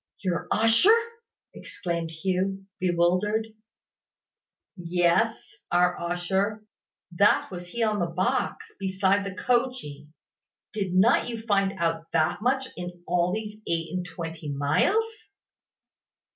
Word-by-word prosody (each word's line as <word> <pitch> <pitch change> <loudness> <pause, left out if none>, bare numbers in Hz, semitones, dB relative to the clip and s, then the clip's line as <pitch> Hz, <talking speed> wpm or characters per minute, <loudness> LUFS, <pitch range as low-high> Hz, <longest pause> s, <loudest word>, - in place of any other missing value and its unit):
"Your 180 -3 -1
usher!" 230 - +5 0.6
exclaimed 170 -2 -4
Hugh, 190 +4 -2
bewildered. 185 +5 +1 1.3
"Yes, 175 +5 +1 0.2
our 180 0 +3
usher. 190 +5 -1 0.5
That 200 +4 +3
was 180 -1 -7
he 230 +6 -2
on 215 -2 +1
the 175 - +1
box, 180 +2 -1
beside 195 +1 +1
coachee. 240 - -1 0.7
Did 195 -4 -2
not 215 +6 +4
you 230 -2 -5
find 200 -3 +2
out 165 -1 -1
that 160 +4 +1
much 265 +3 +1
in 175 0 -8
all 175 0 +1
these 210 +1 -4
eight 165 0 -2
and 180 -1 -2
twenty 165 -3 -7
miles?" 150 - +2
185 Hz, 110 wpm, -26 LUFS, 170-210 Hz, 1.3 s, usher